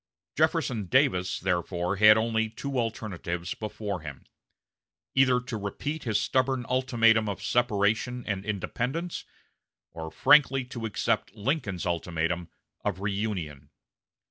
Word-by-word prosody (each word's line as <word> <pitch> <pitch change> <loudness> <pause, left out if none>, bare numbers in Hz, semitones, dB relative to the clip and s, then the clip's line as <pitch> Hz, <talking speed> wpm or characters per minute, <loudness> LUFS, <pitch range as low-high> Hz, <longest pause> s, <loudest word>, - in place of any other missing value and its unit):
Jefferson 110 -6 +1
Davis 95 -8 +2
therefore 90 +1 -1
had 105 +1 +8
only 110 0 +1
two 130 +4 -3
alternatives 95 -6 -3
before 105 -3 -4
him 75 -4 -9 0.9
either 130 -2 +4
to 125 -1 -6
repeat 135 +10 -4
his 110 -3 +1
stubborn 130 +3 +1
ultimatum 115 -4 +3
of 100 - -4
separation 120 +2 +1
and 100 -3 -2
independence, 125 - -3 0.7
or 80 0 -6
frankly 135 - +5
to 120 -2 -5
accept 105 0 -1
Lincoln's 105 - -2
ultimatum 85 0 -1 0.3
of 100 -3 -2
reunion. 95 -8 -3
110 Hz, 115 wpm, -28 LUFS, 90-125 Hz, 0.9 s, had